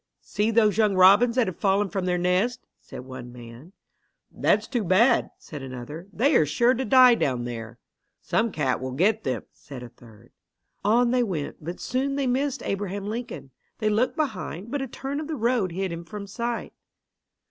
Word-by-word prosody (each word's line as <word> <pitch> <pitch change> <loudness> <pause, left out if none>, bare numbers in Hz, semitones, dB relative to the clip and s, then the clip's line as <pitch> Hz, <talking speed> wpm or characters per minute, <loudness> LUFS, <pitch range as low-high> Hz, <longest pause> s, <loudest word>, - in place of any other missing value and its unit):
"See 210 +2 -1
those 220 -2 +3
young 210 -3 +3
robins 200 +6 +6
that 250 -2 +3
have 185 - -6
fallen 200 +1 +2
from 190 -1 -3
their 180 -1 +1
nest," 185 +8 0
said - - -10
one 130 -2 -9
man. 120 +6 -12 0.6
"That's - - +1
too 240 -4 -1
bad," 215 +7 +3
said 150 -3 -9
another. 135 +7 -8
"They 265 +8 +2
are 155 - +4
sure 235 - +3
to 260 +1 -2
die 255 -1 +7
down 130 - 0
there." 115 -1 -7 0.4
"Some 225 0 0
cat 135 -7 -1
will 130 0 -4
get 205 +10 +2
them," 130 - -2
said 135 -4 -11
a 120 - -9
third. 115 -3 -18 0.5
On 235 +4 +3
they 250 0 +2
went, 180 -11 -3
but 175 +3 -6
soon 270 +3 -1
they 280 -1 -1
missed 265 +2 -1
Abraham 200 0 -3
Lincoln. 215 - -6 0.3
They 215 - 0
looked 225 +5 +1
behind, 215 - -4
but 285 -1 -2
a 270 - -3
turn 275 +3 -5
of 305 - -5
the 320 - -3
road 235 -6 0
hid 190 +1 -3
him 170 0 -6
from 205 +3 -8
sight. 235 +4 -4
200 Hz, 190 wpm, -25 LUFS, 155-240 Hz, 0.6 s, die